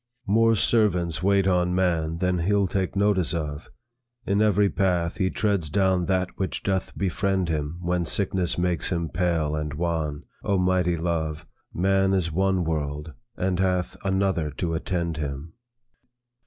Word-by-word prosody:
"More 115 +3 +4
servants 90 -7 +2
wait 100 0 +3
on 90 -1 +2
man 85 -3 0
Than 90 0 0
he'll 100 +3 +2
take 95 0 -2
notice 100 -4 +2
of. 75 -2 -4 0.6
In 100 +2 +1
every 105 -1 +4
path, 90 -4 0
He 95 - +1
treads 100 -8 0
down 95 -1 +2
that 95 -1 0
which 95 - -3
doth 95 -1 -2
befriend 95 -1 0
him 75 +1 -2
When 90 0 0
sickness 95 -1 0
makes 90 -1 0
him 85 -2 -1
pale 80 -3 0
and 75 -1 -3
wan. 80 -2 -2 0.2
Oh 100 -2 +1
mighty 90 -1 +2
love! 80 -2 -2 0.3
Man 95 +2 +2
is 85 -3 0
one 95 +2 +1
world, 75 -1 -3 0.2
and 90 -1 -1
hath 90 -1 0
Another 95 -5 0
to 80 +4 -3
attend 85 -1 -2
him." 75 +1 -5
90 Hz, 150 wpm, -25 LUFS, 80-95 Hz, 0.6 s, More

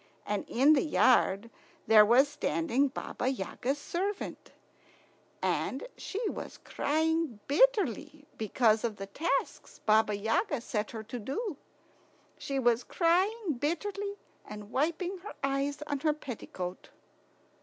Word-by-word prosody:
And 205 -1 -2
in 275 +6 +5
the 280 - +4
yard 230 - +3 0.3
there 215 -1 +8
was 245 +6 +5
standing 260 - 0
Baba 255 -1 -4
Yaga's 260 +3 -2
servant, 385 +7 -4 0.9
and - - -1
she 430 +3 -4
was - - -6
crying 320 -4 0
bitterly 300 - +2
because 220 0 +2
of 230 -3 -1
the 195 - -6
tasks 305 - -2
Baba 215 -1 +4
Yaga 235 - 0
set 215 -2 -3
her 220 -2 -6
to 240 +3 -6
do. 295 - -3 0.8
She 275 - -3
was 240 -2 +3
crying 365 - +1
bitterly 400 +7 -2 0.3
and 210 0 -10
wiping 340 +7 -1
her 405 +4 -9
eyes 275 +2 -1
on 290 -2 -2
her 305 +1 +2
petticoat. 190 -10 -7
275 Hz, 125 wpm, -30 LUFS, 225-330 Hz, 0.9 s, there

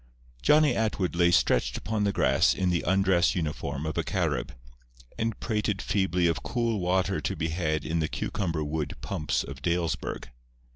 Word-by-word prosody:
Johnny 150 - +4
Atwood 105 -6 -1
lay 85 0 +4
stretched 60 -7 +2
upon 105 -2 -1
the 100 - +2
grass - - +3
in 90 -1 +1
the 85 - 0
undress 95 -1 +3
uniform 75 -3 -3
of 80 - -2
a - - +1
Carib, - - -1 0.7
and 110 -1 -1
prated 105 -3 -1
feebly 90 -2 +1
of 85 -1 +1
cool 115 -3 -1
water 95 +2 0
to - - -2
be 80 +1 -2
had 80 -2 -1
in 80 +1 -1
the 80 - 0
cucumber 85 -4 -2
wood 75 0 -3
pumps 85 -3 -1
of 70 -1 -9
Dalesburg. 85 -5 -2
90 Hz, 165 wpm, -27 LUFS, 80-100 Hz, 0.7 s, Johnny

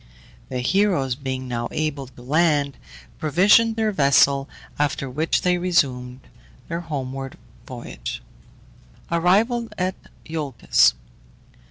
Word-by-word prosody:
The 125 -1 -3
heroes 175 -3 +2
being 130 -1 -4
now 120 -1 -2
able 150 -3 -2
to 125 -1 -16
land, 145 0 +2 0.4
provisioned 200 +9 +4
their 220 -1 +1
vessel, 140 -4 +3 0.3
after 145 -1 0
which 150 +6 0
they 180 -1 +2
resumed 130 -8 0 0.5
their 170 0 -3
homeward 135 -4 -5 0.3
voyage. - - -7 0.9
ARRIVAL 215 +8 +2
AT 185 +1 0 0.3
IOLCUS. 135 - +2
145 Hz, 100 wpm, -23 LUFS, 130-180 Hz, 0.9 s, provisioned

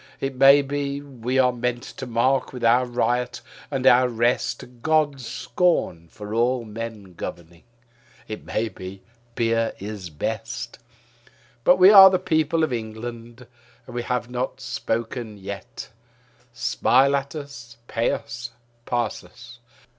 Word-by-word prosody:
It 135 0 -2
may 135 +2 +7
be 140 0 -3
we 130 -3 -4
are 130 -1 +4
meant 125 0 -2
to 130 - -8
mark 125 +3 +1
with 125 -2 -8
our 120 +2 +4
riot 120 0 -1 0.3
and 135 -2 -3
our 125 -1 +6
rest 120 +1 -1
God's 150 -4 +1
scorn 120 - 0
for 105 +5 -9
all 120 +1 +1
men 110 -3 -7
governing. 85 0 -8 0.7
It 110 - -7
may 115 - -2
be 95 -1 -10 0.3
beer 115 -1 +1
is 100 -3 -7
best. - - -5 0.8
But 180 - +6
we 185 +2 +8
are 195 -2 +11
the 185 - +2
people 160 -2 +1
of 155 - 0
England; 115 +1 -7 0.4
and - - -11
we 120 - -2
have 125 0 -2
not 125 +1 -4
spoken 115 -2 -4
yet. 100 +1 -8 0.6
Smile 130 +3 +2
at 140 +2 -3
us, 130 -6 -9
pay 115 - 0
us, 120 +1 -5 0.4
pass 120 -5 -1
us. 120 +6 -14
120 Hz, 140 wpm, -23 LUFS, 115-135 Hz, 0.8 s, are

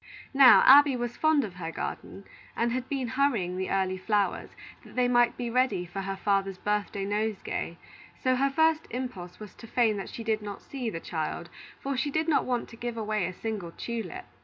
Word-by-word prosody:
Now, 270 -2 +8
Abby 280 0 +8
was 240 -1 -3
fond 310 -2 +3
of 200 -5 -6
her 165 -2 -5
garden, 195 - -6 0.3
and 235 0 +1
had 255 +1 -3
been 265 -4 -2
hurrying 235 -9 +1
the 190 0 -3
early 190 -1 0
flowers, 205 -2 0 0.3
that - - -15
they 250 -1 +3
might 240 -1 +3
be 245 - -3
ready 255 -7 +1
for 185 +3 -5
her 195 0 -3
father's 195 -1 0
birthday 205 0 -2
nosegay; 205 -4 -2 0.4
so 255 0 +2
her 275 +2 +2
first 320 +2 +2
impulse 200 -8 -6
was 210 -3 -10
to 230 - -13
feign 225 -3 +2
that 195 - -5
she 230 - -7
did 220 -1 0
not 205 -1 -7
see 255 -4 -4
the 165 - -5
child, 165 +1 -4 0.3
for 275 0 -3
she 260 +3 0
did 315 +3 -1
not 315 - +2
want 245 -2 -1
to - - -11
give 235 0 -5
away 215 -4 -1
a - - -4
single 200 -4 -5
tulip. 235 +11 -5
225 Hz, 205 wpm, -28 LUFS, 195-255 Hz, 0.4 s, Now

